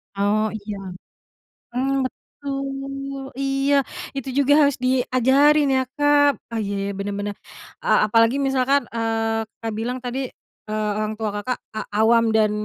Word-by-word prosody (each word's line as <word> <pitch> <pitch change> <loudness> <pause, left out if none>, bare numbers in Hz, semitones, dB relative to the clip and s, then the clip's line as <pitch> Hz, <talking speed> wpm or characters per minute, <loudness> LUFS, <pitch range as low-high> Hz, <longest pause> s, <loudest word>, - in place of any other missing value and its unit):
Oh 210 +2 +1
iya, 210 -1 -6 1.0
mmm, 270 +1 +1
betul, 275 0 -6
iya 275 +1 +2 0.3
itu 270 -1 -4
juga 280 0 +4
harus 280 -2 +2
diajarin 260 +4 +3
ya 260 - +3 0.2
Kak, 290 -1 +4
ah 230 -1 -3
iya 200 0 -3
bener 200 +1 -4
bener, 205 0 -3 0.5
eee, - - +4
apalagi 230 +4 +3
misalkan, 270 -1 +2
eee, 225 -1 0 0.2
Kak, 225 -1 -4
bilang 240 +4 -3
tadi 255 +1 -4 0.4
eee, 215 0 -1
orang 215 0 -2
tua 215 -2 -2
Kakak, 250 +3 -2 0.2
a 215 - -2 0.2
awam 230 +1 +4
dan 220 -1 +3
250 Hz, 140 wpm, -22 LUFS, 220-275 Hz, 1.0 s, juga